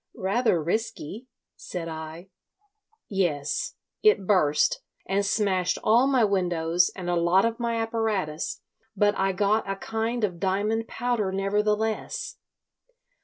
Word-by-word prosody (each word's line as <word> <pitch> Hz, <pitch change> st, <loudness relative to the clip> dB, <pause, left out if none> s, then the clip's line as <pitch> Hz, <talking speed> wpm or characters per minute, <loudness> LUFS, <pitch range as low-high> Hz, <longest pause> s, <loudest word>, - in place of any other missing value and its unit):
"Rather 195 Hz, 0 st, +1 dB
risky," 220 Hz, -, -3 dB, 0.3 s
said 170 Hz, -2 st, -6 dB
I. 160 Hz, +3 st, -7 dB, 0.8 s
"Yes. 160 Hz, -7 st, -1 dB, 0.3 s
It 425 Hz, -, +4 dB
burst, 185 Hz, -, +3 dB, 0.2 s
and 195 Hz, +1 st, +1 dB
smashed 195 Hz, -3 st, +1 dB
all 235 Hz, +5 st, +5 dB
my 260 Hz, -4 st, +3 dB
windows 175 Hz, -4 st, +2 dB
and 185 Hz, -2 st, -6 dB
a 175 Hz, -, +1 dB
lot 175 Hz, +4 st, +3 dB
of 230 Hz, +1 st, -1 dB
my 235 Hz, -1 st, -1 dB
apparatus; 220 Hz, -8 st, -2 dB, 0.4 s
but 205 Hz, +1 st, +3 dB
I 195 Hz, 0 st, +1 dB
got 205 Hz, +2 st, +1 dB
a 195 Hz, -, -1 dB
kind 225 Hz, +3 st, -2 dB
of 180 Hz, -5 st, -1 dB
diamond 210 Hz, +5 st, 0 dB
powder 235 Hz, -4 st, -1 dB
nevertheless. 210 Hz, +3 st, -1 dB
200 Hz, 120 wpm, -26 LUFS, 180-225 Hz, 0.8 s, all